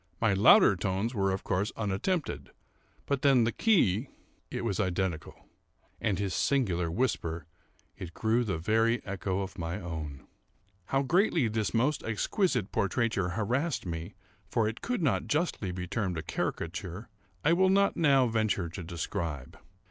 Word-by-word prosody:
My 110 -3 +3
louder 100 0 +7
tones 95 +6 -1
were, 95 -3 +1
of 95 - -3
course, 95 +4 -1
unattempted, 115 - -2 0.6
but 140 -2 -1
then 135 -4 +5
the 115 - +1
key—it 130 - 0
was 105 -3 -1
identical; 95 -4 -2 0.5
and 100 -4 0
his 100 -1 -2
singular 90 -12 +1
whisper, 85 - -1 0.5
it 85 -2 -7
grew 115 +2 +1
the 95 -7 -2
very 110 +7 +1
echo 100 -1 -2
of 95 0 -6
my 85 +4 -3
own. 80 -6 -6 0.6
How 135 +6 +1
greatly 170 - +2
this 110 -2 -1
most 130 +6 +2
exquisite 115 - 0
portraiture 100 -3 0
harassed 130 +8 -1
me, 85 -1 -5 0.3
(for 110 -2 +1
it 110 +2 -5
could 245 -7 -2
not 140 - +1
justly 150 - -1
be 90 0 -4
termed 95 -2 -2
a 80 - -4
caricature,) 85 +6 -4 0.4
I 165 - +4
will 190 +2 +4
not 200 +1 +3
now 140 -5 +4
venture 110 -6 0
to 90 +3 -7
describe. 85 - -4
105 Hz, 150 wpm, -29 LUFS, 90-125 Hz, 0.6 s, louder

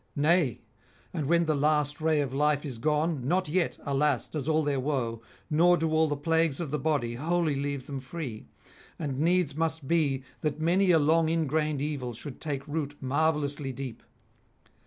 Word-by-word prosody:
Nay, 150 - +2 0.5
and 155 -6 -2
when 170 +2 +3
the 155 - +2
last 150 +1 +1
ray 155 -1 +3
of 135 -2 -3
life 150 +1 +1
is 130 -5 -6
gone, 150 0 0
not 185 +3 +1
yet, 170 +2 0
alas! 140 -2 +1
does 150 -1 -3
all 155 0 +3
their 145 -2 0
woe, 125 -5 -2 0.3
nor 170 +3 +4
do 160 -1 0
all 160 0 +3
the 145 -1 -2
plagues 160 -1 +1
of 165 -5 -4
the 150 - -1
body 130 -6 0
wholly 160 +3 0
leave 140 -1 -3
them 140 -2 -5
free; 130 -4 -7 0.5
and 140 -4 -3
needs 170 -2 +2
must 160 -2 -2
be 140 -5 +1 0.2
that 155 -1 -2
many 180 +4 +3
a 170 - +6
long 160 +2 +3
ingrained 155 -2 0
evil 135 -6 -3
should 135 +3 -9
take 145 -2 -3
root 145 -1 -3
marvellously 145 0 0
deep. 130 -2 -7
150 Hz, 180 wpm, -28 LUFS, 140-160 Hz, 0.5 s, a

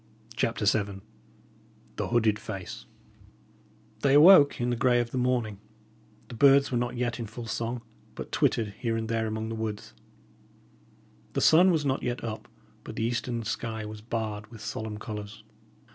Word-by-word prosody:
CHAPTER 115 -2 -1
VII 100 -2 +1 1.0
THE - - -2
HOODED 110 -3 +2
FACE 95 -4 -7 1.1
They 140 0 +3
awoke 150 -1 +8
in 120 0 0
the - - +1
grey 120 +1 +3
of 120 -1 -2
the 130 - -1
morning; 120 -5 0 0.7
the - - -10
birds 140 +3 +5
were 125 - +1
not 120 0 -3
yet 120 -1 -2
in 115 - -4
full 115 +2 -8
song, 115 +1 -3 0.3
but - - -7
twittered 110 -2 +1
here 115 -2 -1
and 110 0 -3
there 115 -1 -1
among 110 +1 -3
the - - -4
woods; 110 - -5 1.4
the - - 0
sun 175 +4 +6
was 160 -5 +1
not 135 -1 0
yet 120 0 -3
up, 110 -1 -5 0.4
but - - -8
the - - -2
eastern 120 0 -2
sky 110 0 -4
was 105 0 -8
barred 110 -2 -4
with 115 -2 -12
solemn 110 -1 -5
colours. 105 -1 -7
115 Hz, 165 wpm, -28 LUFS, 110-125 Hz, 1.4 s, awoke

